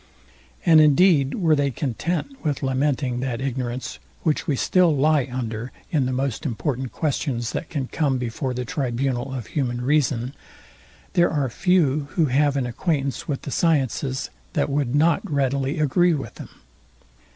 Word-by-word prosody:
And 160 -2 +7
indeed 150 -2 +4
were 165 -5 +3
they 140 -1 +1
content 160 - -3
with 145 -4 -1
lamenting 130 -1 0
that 125 -2 -2
ignorance, 130 -2 -3 0.2
which 155 -2 0
we 145 - +1
still 175 +3 +3
lie 145 -1 +3
under 120 -1 -4 0.2
in 140 -5 +2
the - - -1
most 130 -2 -2
important 130 -1 -2
questions, 125 -6 -2
that 170 - -4
can 140 -4 -2
come 140 -3 0
before 125 +1 -3
the 125 0 -3
tribunal 130 0 -2
of 130 -4 -5
human 125 -3 -2
reason, 130 -2 +1 0.8
there 175 -2 +4
are 145 -4 0
few, 155 -4 +2
who 165 - +4
have 140 +1 +2
an 135 - 0
acquaintance 140 +2 -2
with 140 -3 -3
the 140 - -5
sciences, 135 -4 0 0.2
that - - 0
would 140 -2 0
not 160 +3 +3
readily 140 +1 0
agree 165 +4 +3
with 135 - -6
them. - - -10
140 Hz, 155 wpm, -23 LUFS, 125-150 Hz, 0.8 s, And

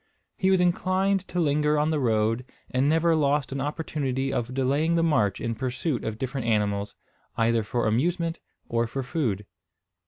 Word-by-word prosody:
He 190 - +1
was 190 -1 +4
inclined 185 +2 +1
to 180 - -3
linger 150 -1 +2
on 150 +2 +2
the 155 - +1
road, 115 -1 +1 0.3
and 130 +3 +2
never 165 +1 +3
lost 145 -2 +1
an 135 0 -3
opportunity 135 -3 -2
of 120 +1 -2
delaying 140 +6 +1
the 165 - +2
march 110 -12 +2
in 115 - -2
pursuit 130 +3 -2
of 110 -1 -3
different 130 -1 -3
animals, 105 -2 0 0.4
either 115 0 +3
for 120 +3 -1
amusement 165 +9 0 0.3
or 115 0 0
for 135 +3 -4
food. 120 - -2
135 Hz, 165 wpm, -26 LUFS, 115-160 Hz, 0.4 s, was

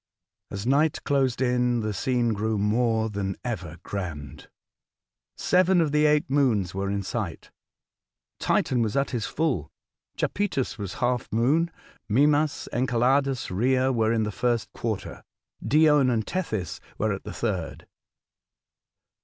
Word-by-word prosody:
As 100 +1 -5
night 145 +4 +2
closed 135 -3 +1
in, 125 -1 +1
the 110 -1 -2
scene 120 +3 0
grew 110 +1 -1
more 110 +2 +1
than 100 -3 -3
ever 90 -9 -4
grand. 80 -8 -6 0.9
Seven 185 0 +3
of 160 -3 +2
the 150 +1 +4
eight 150 0 +2
moons 120 -10 +1
were 95 +1 -2
in 100 0 -1
sight. 95 -3 -5 0.9
Titan 125 -2 +1
was 110 +2 0
at 140 0 +1
his 120 -5 -2
full, 135 - -1 0.5
Japetus 180 - -1
was 100 -2 -5
half 125 0 -1
moon; 140 +10 +2 0.4
Mimas, 145 +6 +2
Enceladus, 130 +1 +1
Rhea, 130 +6 +2
were 110 -2 +2
in 115 -1 +1
the 105 - -2
first 120 0 -1
quarter; 110 -4 -4 0.4
Dione 150 -3 +4
and 110 -3 0
Tethys 110 - -3 0.2
were 110 -1 0
at 100 - -6
the - - -7
third. 95 -8 -3
120 Hz, 135 wpm, -26 LUFS, 105-140 Hz, 0.9 s, the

